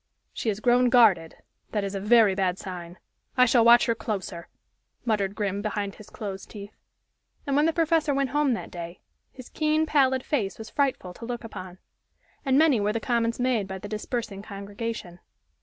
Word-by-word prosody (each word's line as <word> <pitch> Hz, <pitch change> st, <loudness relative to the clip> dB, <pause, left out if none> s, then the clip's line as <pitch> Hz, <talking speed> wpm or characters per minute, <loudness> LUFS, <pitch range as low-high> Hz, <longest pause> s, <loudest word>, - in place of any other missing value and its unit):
"She 225 Hz, -, -2 dB
has 205 Hz, -1 st, -2 dB
grown 245 Hz, +2 st, +4 dB
guarded 210 Hz, -10 st, +4 dB, 0.4 s
that 210 Hz, -2 st, 0 dB
is 195 Hz, 0 st, -3 dB
a 195 Hz, -, -2 dB
very 215 Hz, 0 st, +5 dB
bad 190 Hz, -1 st, 0 dB
sign 180 Hz, -2 st, -8 dB, 0.4 s
I 250 Hz, -, +7 dB
shall 240 Hz, -1 st, +4 dB
watch 235 Hz, +1 st, +7 dB
her 230 Hz, -, +2 dB
closer," 205 Hz, -6 st, -5 dB, 0.6 s
muttered 205 Hz, -4 st, 0 dB
Grim 200 Hz, -2 st, -2 dB
behind 205 Hz, -1 st, -3 dB
his 215 Hz, -, -14 dB
closed 195 Hz, -3 st, -7 dB
teeth. 205 Hz, -1 st, -10 dB, 0.7 s
And 275 Hz, -, 0 dB
when 295 Hz, +2 st, +4 dB
the -, -, +3 dB
professor 325 Hz, -2 st, +2 dB
went 275 Hz, -2 st, 0 dB
home 290 Hz, -3 st, +2 dB
that -, -, -7 dB
day, 170 Hz, 0 st, -8 dB, 0.3 s
his 255 Hz, -2 st, -12 dB
keen, 310 Hz, 0 st, +1 dB
pallid 265 Hz, -4 st, +2 dB
face 210 Hz, -10 st, -1 dB
was 220 Hz, -1 st, -9 dB
frightful 265 Hz, -10 st, -1 dB
to 230 Hz, -, -9 dB
look 240 Hz, 0 st, -5 dB
upon. 185 Hz, -5 st, -8 dB, 0.7 s
And 270 Hz, -2 st, +2 dB
many 300 Hz, -6 st, +5 dB
were 205 Hz, +1 st, 0 dB
the 230 Hz, -, -1 dB
comments 230 Hz, 0 st, 0 dB
made 245 Hz, -5 st, +1 dB
by 190 Hz, 0 st, -5 dB
the 200 Hz, -, -8 dB
dispersing 215 Hz, -1 st, -4 dB
congregation. 200 Hz, -2 st, -6 dB
220 Hz, 185 wpm, -26 LUFS, 195-250 Hz, 0.7 s, I